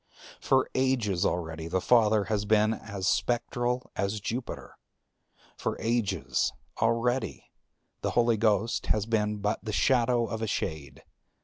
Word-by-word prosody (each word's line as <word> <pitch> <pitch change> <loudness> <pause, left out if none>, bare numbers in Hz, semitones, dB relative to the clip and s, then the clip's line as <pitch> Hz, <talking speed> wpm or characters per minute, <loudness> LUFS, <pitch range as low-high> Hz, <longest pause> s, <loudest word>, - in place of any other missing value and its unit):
For 130 -1 +2
ages 125 -9 +1
already 80 -2 -3
the 95 +3 0
Father 110 -1 +4
has 105 0 -1
been 110 +1 +3
as 100 -4 -5
spectral 120 +1 0
as 100 +2 -1
Jupiter; 120 +4 -5 0.8
for - - -3
ages 115 -2 0 0.3
already 115 +3 0 0.5
the - - 0
Holy 115 -1 +4
Ghost 110 0 +1
has 105 -2 +1
been 105 -2 0
but 105 +1 -1
the 110 - -4
shadow 120 +1 +2
of 110 -1 -5
a 110 - -1
shade. 75 -9 -4
110 Hz, 130 wpm, -28 LUFS, 100-120 Hz, 0.8 s, Father